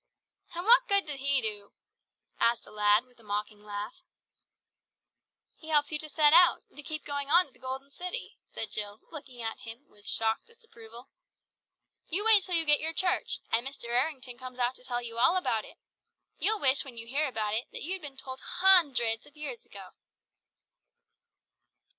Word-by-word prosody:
"And 350 +2 -4
what 475 +3 +6
good 400 -1 +5
do 300 - -3
He 275 0 +2
do?" 205 -2 -3 0.7
asked 235 0 +2
a - - -15
lad 210 +2 +3
with 250 -1 -26
a - - -18
mocking 210 0 -4
laugh. 210 +2 -7 1.5
"He 315 - -12
helps 295 -1 +2
you 300 - -2
to 310 - -4
set 300 0 +4
out, 350 +1 +6
and 295 - -9
keep 310 +1 -5
on 285 -1 -3
going 345 +5 +5
to 275 - -24
the - - -24
Golden 265 +2 -6
City," 365 - -6
said 220 - -6
Jill, 205 0 -4
looking 260 -6 -9
at 225 0 -3
him 230 +5 -9
with 205 0 -16
shocked 225 0 0
disapproval. 240 - -15 1.0
"You 395 +6 -2
wait 440 -2 +8
till 365 -1 -1
you 330 -1 +4
get 295 -1 +5
your 320 +1 -2
church, 360 +1 0
and 235 +3 +2
Mr. 270 -4 -8
Errington 255 -1 -2
comes 255 -1 -9
out 245 0 0
to - - -19
tell 245 -1 -3
you 230 0 -6
all 335 +8 +4
about 225 -12 -1
it. - - -15 0.6
You'll 435 0 +3
wish 270 -3 +3
when 255 -4 -12
you 230 - -6
hear 280 +6 -1
about 215 -4 -2
it, 225 +3 -1
that - - -7
you'd 370 +4 -3
been 285 -3 -9
told 260 0 -6
hundreds 285 -14 +3
of 295 - -21
years 275 -6 -7
ago!" 195 -2 -11
265 Hz, 185 wpm, -29 LUFS, 230-315 Hz, 1.5 s, wait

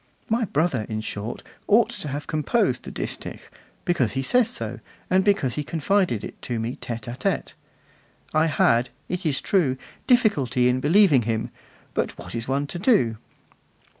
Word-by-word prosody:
My 230 +1 +2
brother, 150 - 0
in 110 -1 -2
short, 110 +1 -5 0.2
ought 225 +3 +5
to 195 - -5
have 145 +1 -4
composed 155 - +1
the - - -6
distich, - - -5 0.5
because 160 - +1
he 135 - -1
says 245 - +4
so, 115 +2 -4 0.3
and 190 +1 +4
because 190 - +2
he 150 - -2
confided 165 - +1
it - - -8
to 120 -2 -3
me 115 +3 -3
tete 115 -2 -5
'a 120 - -4
tete. - - -1 0.8
I 155 +1 +4
had, 125 -4 +3 0.2
it 180 -1 -2
is 140 -3 +2
true, 150 -10 +2 0.3
difficulty 145 - +3
in 125 +1 +2
believing 155 -1 +5
him; 110 -1 -2 0.4
but - - -2
what - - -9
is 115 0 -4
one 140 +2 0
to 175 +4 -5
do! 170 - +3
140 Hz, 165 wpm, -24 LUFS, 120-185 Hz, 0.8 s, ought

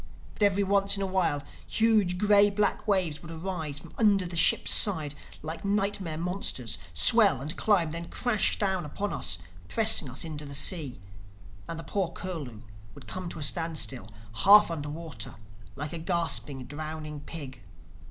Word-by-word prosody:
But - - -17
every 200 -1 +3
once 200 0 +2
in 195 - -2
a - - 0
while 175 -7 0 0.2
huge 215 -5 +2
gray 205 +1 +5
black 205 +1 0
waves 185 -7 0
would 165 - -11
arise 165 -3 -5
from 155 +2 -12
under 200 -4 +3
the 175 0 -6
ship's 165 - +3
side 160 -8 +2 0.3
like 160 +1 -6
nightmare 200 -5 -1
monsters, 165 - -3
swell 195 - +6
and 150 +6 -5
climb, 180 -7 +2
then 170 +1 -6
crash 240 -5 +2
down 190 -3 0
upon 200 +7 -4
us, - - +1 0.3
pressing 220 - +4
us 125 +6 -4
into 150 -2 -6
the 140 -1 -7
sea; 145 -4 0 0.7
and 165 - -5
the - - -7
poor 195 0 -1
Curlew 155 -12 -7 0.3
would - - -13
come 185 -2 -6
to - - -8
a 155 - -4
standstill, 155 -6 0 0.3
half 205 - +7
under 150 -3 -4
water, 150 -8 -7 0.4
like 150 +3 -5
a 170 - -5
gasping, 160 -6 -1
drowning 155 +1 -7
pig. 140 -5 -8
170 Hz, 165 wpm, -28 LUFS, 150-200 Hz, 0.7 s, half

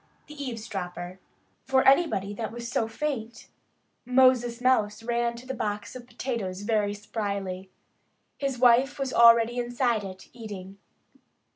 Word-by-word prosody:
XVII 300 - -10
THE 285 - -6
EAVESDROPPER 190 -6 -6 0.5
FOR 265 0 +3
ANYBODY 270 - +3
that 220 +1 -4
was 235 0 -6
so 225 - 0
faint, 235 -2 -5 0.5
Moses 250 -2 +3
Mouse 225 -4 +1
ran 235 0 0
to 240 +2 -11
the 265 - -4
box 210 -3 -4
of 245 -1 -9
potatoes 210 -9 -4
very 205 -1 0
spryly. 200 -3 -4 0.7
His 275 -2 -2
wife 250 +3 +4
was 270 -2 -3
already 235 +1 +6
inside 240 -2 0
it, 190 -1 -9
eating. 200 -5 -9
235 Hz, 135 wpm, -27 LUFS, 205-250 Hz, 0.7 s, already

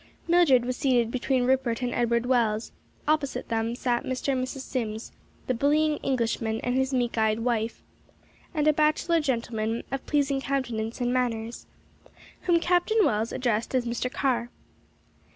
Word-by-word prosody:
Mildred 330 -8 +5
was 250 0 -2
seated 240 -4 +2
between 255 0 0
Rupert 255 -1 +1
and 245 - -1
Edward 235 0 +1
Wells; 230 -3 +1 0.4
opposite 290 -5 0
them 225 0 -1
sat 245 -1 0
Mr. 260 +2 -3
and 255 -1 0
Mrs. 260 +1 -5
Sims, 225 -4 -4 0.3
the 255 - 0
bullying 300 +4 +2
Englishman 230 -3 -1
and 245 - -1
his 265 +1 +1
meek 245 -3 0
eyed 220 0 +2
wife, 230 -1 -1 0.7
and 305 -3 0
a 305 - +6
bachelor 310 +3 +2
gentleman 230 -5 -1
of 270 - -3
pleasing 280 -2 +1
countenance 240 -4 -2
and 245 0 +1
manners, 235 -2 -2 0.8
whom 345 -1 +5
Captain 360 +6 +3
Wells 215 +2 0
addressed 235 0 -1
as 250 -2 +1
Mr. 240 +1 -2
Carr. 245 -4 0
250 Hz, 150 wpm, -27 LUFS, 230-275 Hz, 0.8 s, a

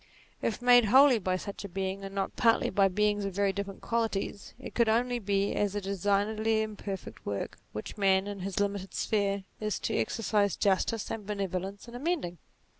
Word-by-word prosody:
If 230 +2 -2
made 245 -1 +7
wholly 260 +2 +6
by 185 -2 0
such 200 +2 -7
a 200 - -6
Being, 190 +1 -3
and 195 0 -7
not 195 -1 -2
partly 230 -1 +3
by 195 0 +4
beings 205 +2 +1
of 195 -2 -4
very 200 -1 +2
different 200 0 -5
qualities, 225 -3 -2
it - - -8
could 235 -2 +3
only 240 +2 +2
be 200 -1 0
as 205 -1 0
a - - +1
designedly 205 +3 +1
imperfect 205 -3 -6
work, 100 -1 -4
which 105 - -7
man, 190 -1 +3
in 205 -1 -5
his 190 +1 -3
limited 200 -1 -2
sphere, 200 -2 0 0.2
is 215 -1 -1
to - - -1
exercise 200 - +1
justice 200 +2 +1
and 210 -3 -5
bene 200 -2 -1
volence 190 +4 -5
in 235 - -11
amending. 245 - -2
200 Hz, 190 wpm, -30 LUFS, 195-220 Hz, 0.2 s, made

